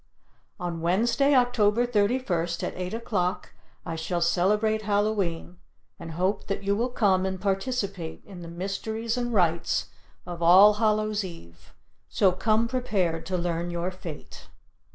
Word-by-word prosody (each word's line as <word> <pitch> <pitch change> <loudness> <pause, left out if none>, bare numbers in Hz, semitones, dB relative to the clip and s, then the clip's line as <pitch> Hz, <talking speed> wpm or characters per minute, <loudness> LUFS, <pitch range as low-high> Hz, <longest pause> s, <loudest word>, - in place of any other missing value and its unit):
On 175 -2 -4
Wednesday, 235 - +2
Oct. 245 -2 +3
31st, 210 -5 +1
at - - -2
8 180 +1 -5
o'clock, 190 -6 -2 0.3
I 165 - -4
shall 165 +2 -2
celebrate 210 +6 +2
Hallow 210 0 +1
e'en 170 0 -4 0.4
and 165 -1 -8
hope 185 +5 -1
that 200 0 -3
you 200 +1 +1
will 235 +4 0
come 195 -6 +2
and 190 0 -2
participate 195 -3 -3
in 185 -3 -11
the 170 - -8
mysteries 220 +6 -3
and 240 -1 -2
rites 170 -6 +1 0.3
of 175 -1 -7
All 190 +5 +8
Hallow's 215 -1 +1
Eve, 85 - -12 0.3
so 195 -2 +3
come 215 +5 +1
prepared 195 -10 -1
to 185 -1 -1
learn 170 0 -2
your 175 +1 -2
fate. 170 -5 -10
195 Hz, 145 wpm, -26 LUFS, 175-215 Hz, 0.4 s, All